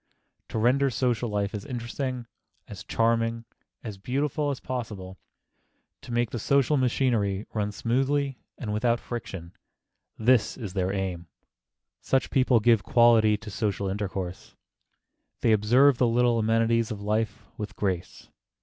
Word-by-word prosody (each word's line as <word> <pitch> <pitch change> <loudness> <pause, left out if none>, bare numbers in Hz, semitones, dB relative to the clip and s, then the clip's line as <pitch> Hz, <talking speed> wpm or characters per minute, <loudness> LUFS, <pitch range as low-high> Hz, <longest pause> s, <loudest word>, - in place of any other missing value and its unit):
To - - -4
render 130 +5 +3
social 120 -1 0
life 100 -1 -1
as 105 - -5
interesting, 125 -1 -4 0.4
as 95 -3 -9
charming, 115 +1 0 0.4
as 105 -4 -7
beautiful 145 +6 -1
as 140 - -3
possible, 105 -7 -6 0.8
to - - -10
make 120 -1 0
the 120 - -3
social 140 +5 +2
machinery 115 -6 +1
run 105 -1 -1
smoothly 135 +5 0 0.2
and 105 -3 -4
without 115 +2 +1
friction,—this 110 +3 -3
is 105 -8 -6
their 95 -1 0
aim. 95 -3 -3 0.7
Such 135 -1 0
people 130 -3 +4
give 115 -1 +4
quality 115 -2 +4
to 105 0 -10
social 100 -2 -1
intercourse. 95 -2 -5 0.9
They 115 - +3
observe 120 +6 +4
the 125 - +4
little 120 0 +2
amenities 115 +1 +2
of 105 - -5
life 105 0 -1
with 105 -1 -5
grace. 95 -4 -3
115 Hz, 130 wpm, -26 LUFS, 105-125 Hz, 0.9 s, people